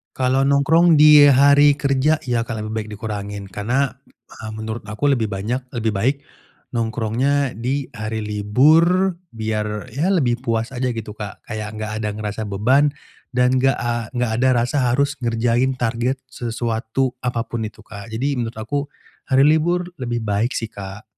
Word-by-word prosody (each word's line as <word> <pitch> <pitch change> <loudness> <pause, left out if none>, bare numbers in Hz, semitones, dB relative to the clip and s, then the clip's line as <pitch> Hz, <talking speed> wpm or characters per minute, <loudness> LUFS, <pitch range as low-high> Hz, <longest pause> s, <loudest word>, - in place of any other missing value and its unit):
Kalau 130 +1 +2
nongkrong 150 +4 +4
di 150 -1 +9
hari 145 +1 +6
kerja 140 +2 +2
ya, 120 -2 +1
akan 115 - -5
lebih 110 - -6
baik 110 -1 -3
dikurangin. 105 -2 -5
Karena, 120 +9 0 0.4
eee, 110 0 -9
menurut 110 +1 -5
aku 110 +7 -2
lebih 115 -6 +1
banyak 120 +7 -3
lebih 110 -4 -2
baik 130 +8 +1 0.6
nongkrongnya 120 +5 0
di 130 +4 -2
hari 110 +1 -4
libur, 155 - +3 0.2
biar 105 -1 -3
ya 150 - -1
lebih 125 -9 +1
puas 115 +2 -2
aja 125 0 -1
gitu, 110 -2 -6
Kak, 105 -3 -7
kayak 110 -2 -5
enggak 110 0 -4
ada 105 - -1
ngerasa 105 +1 -4
beban 125 +9 +2 0.4
dan, 125 0 +2
enggak 135 0 +2
a 120 -2 -2
enggak 125 -2 -1
ada 130 +2 +2 0.2
rasa 135 - -2
harus 140 +3 +1
ngerjain 120 +3 +1
target 120 +3 -1
sesuatu 120 +1 -2
apapun 115 -2 -2
itu, 110 - -7
Kak. 100 +1 -11
Jadi, 135 +5 -1
menurut 115 -2 -4
aku, 140 +5 -3 0.4
hari 135 +2 +5
libur 175 +3 +2
lebih 120 -2 -3
baik 110 +3 -1
sih, 115 - -3
Kak. 100 0 -9
120 Hz, 160 wpm, -21 LUFS, 110-135 Hz, 0.6 s, di